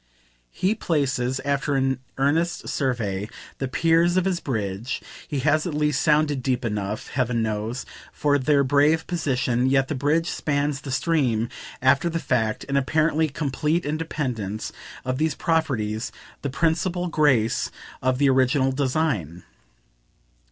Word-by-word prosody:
He 185 - 0
places, 135 - 0
after 140 0 0
an 135 -1 +1 0.2
earnest 160 +5 +1
survey, 110 -7 -1 0.3
the 135 - -1
piers 165 +5 +3
of 185 - +2
his 185 -3 0
bridge 110 -1 -3 0.3
he 145 -3 -2
has 155 +4 +2
at 160 - -3
least 150 -1 +1
sounded 150 -3 +2
deep 125 -1 -1
enough, 105 -1 -3
heaven 125 -3 0
knows, 110 +3 -3 0.3
for 145 -1 +1
their 140 +1 +3
brave 145 +4 +3
position; 130 -7 0
yet 135 0 +2
the - - 0
bridge 150 +5 +1
spans 145 -3 -1
the 140 - -8
stream, 130 -5 +1 0.3
after 140 +6 +4
the 165 - -2
fact, 110 -8 0
in 140 0 -1
apparently 155 +3 +2
complete 150 +4 -1
independence 130 -9 -3 0.3
of 130 +1 -1
these 160 0 +1
properties, 125 -10 0 0.3
the 140 - -2
principal 170 +5 0
grace 135 -9 +2 0.3
of 130 0 +1
the 140 +1 +3
original 130 +1 +3
design. 130 - -1
140 Hz, 135 wpm, -24 LUFS, 125-155 Hz, 0.3 s, after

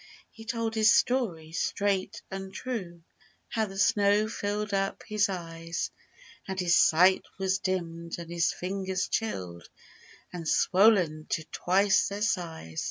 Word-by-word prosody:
He 225 - -13
told 230 -1 -2
his 220 0 +5
story 240 - +1
straight 200 +4 -1
and 195 0 -6
true— 190 -7 -5 0.5
How 220 -1 0
the 195 0 -9
snow 205 +1 +3
filled 210 -1 -3
up 195 0 -1
his 210 -1 +1
eyes; 165 -2 -4 0.6
And 190 -1 -4
his 175 -2 +3
sight 180 +4 +5
was 190 0 0
dimmed 170 -3 -3
and 170 -1 -8
his 170 -1 +1
fingers 190 0 -3
chilled 90 - -3 0.6
And 170 -2 -6
swollen 180 -5 +3
to 160 - -1
twice 195 +2 +3
their 200 +1 -3
size. 165 - -2
190 Hz, 135 wpm, -28 LUFS, 170-210 Hz, 0.6 s, his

